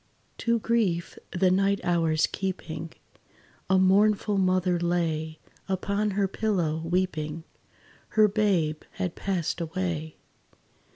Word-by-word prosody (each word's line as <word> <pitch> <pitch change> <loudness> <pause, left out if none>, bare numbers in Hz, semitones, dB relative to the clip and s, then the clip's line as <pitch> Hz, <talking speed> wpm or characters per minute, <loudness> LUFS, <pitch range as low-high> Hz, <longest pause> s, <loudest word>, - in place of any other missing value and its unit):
To 235 0 +2
grief 215 -7 0
the 185 0 +2
night 195 +1 +2
hours 165 -3 +2
keeping, 170 -4 -4 0.8
A 190 - +5
mournful 200 +2 +3
mother 185 -1 +2
lay 160 -2 -1 0.3
Upon 200 +2 0
her 200 -1 +3
pillow, 180 -7 -1
weeping 165 -3 -1 0.7
Her 215 -1 +7
babe 190 -7 +1
had 185 -3 -3
passed 180 -3 -2
away. 165 -2 -3
185 Hz, 105 wpm, -27 LUFS, 165-195 Hz, 0.8 s, Her